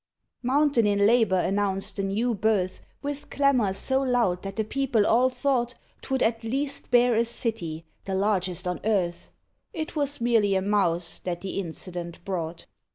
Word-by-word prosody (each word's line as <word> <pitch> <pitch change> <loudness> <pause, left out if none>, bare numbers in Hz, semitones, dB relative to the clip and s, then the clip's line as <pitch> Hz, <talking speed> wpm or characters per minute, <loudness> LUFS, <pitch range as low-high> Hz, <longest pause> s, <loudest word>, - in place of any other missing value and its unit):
Mountain 260 -2 +3
in 200 0 +3
labour 220 -4 +4
announced 195 0 0
the - - 0
new 215 +5 0
birth 200 -3 0 0.2
With 285 0 -5
clamour 270 -8 +2
so 265 +6 +1
loud 240 -9 +1
that 195 0 -6
the 220 - 0
people 245 -2 +1
all 250 +3 +4
thought 250 -1 0 0.3
'Twould 265 -1 0
at 230 0 0
least 275 +5 -2
bear 245 -1 +5
a 230 +1 +3
city, 200 -9 -3 0.2
the 195 - -2
largest 190 -2 0
on 180 - -2
earth. 190 -5 0 0.4
It 315 0 -5
was 285 -1 0
merely 225 -4 +3
a 190 - +2
Mouse 180 -4 0
that 175 -1 -4
the 195 +1 -3
incident 175 -1 -6
brought. 170 -4 -4
215 Hz, 160 wpm, -26 LUFS, 190-245 Hz, 0.4 s, bear